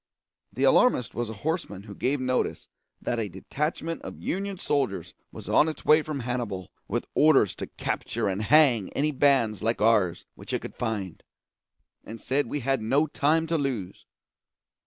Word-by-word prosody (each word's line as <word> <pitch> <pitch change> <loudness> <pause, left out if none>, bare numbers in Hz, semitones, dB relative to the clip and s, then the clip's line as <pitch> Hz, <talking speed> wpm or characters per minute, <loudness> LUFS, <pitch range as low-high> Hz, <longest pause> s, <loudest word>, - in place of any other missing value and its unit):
The 130 +7 -3
alarmist 135 - +4
was 120 -2 -3
a - - -5
horseman 160 - -2
who 105 -1 -10
gave 135 +7 -1
notice 130 0 -1 0.4
that 120 - -1
a 110 -3 -2
detachment 160 - -3
of - - -8
Union 195 +1 -3
soldiers 135 - -1 0.2
was - - -10
on 160 - +4
its 155 - -8
way 155 +1 +6
from 150 -3 -4
Hannibal 115 -7 -4 0.2
with - - -2
orders 150 - +4
to - - -5
capture - - -3
and 95 +1 -1
hang 125 -5 +4
any 150 +2 +1
bands 135 -7 +2
like 115 +2 0
ours 105 -5 +2
which - - -9
it - - 0
could - - -7
find, 105 -7 -3 0.8
and 115 +1 -9
said 140 +2 0
we 145 - -3
had 135 0 0
no 135 +8 +2
time 155 +2 +1
to 165 0 0
lose. 120 -10 -4
130 Hz, 170 wpm, -27 LUFS, 110-150 Hz, 0.8 s, way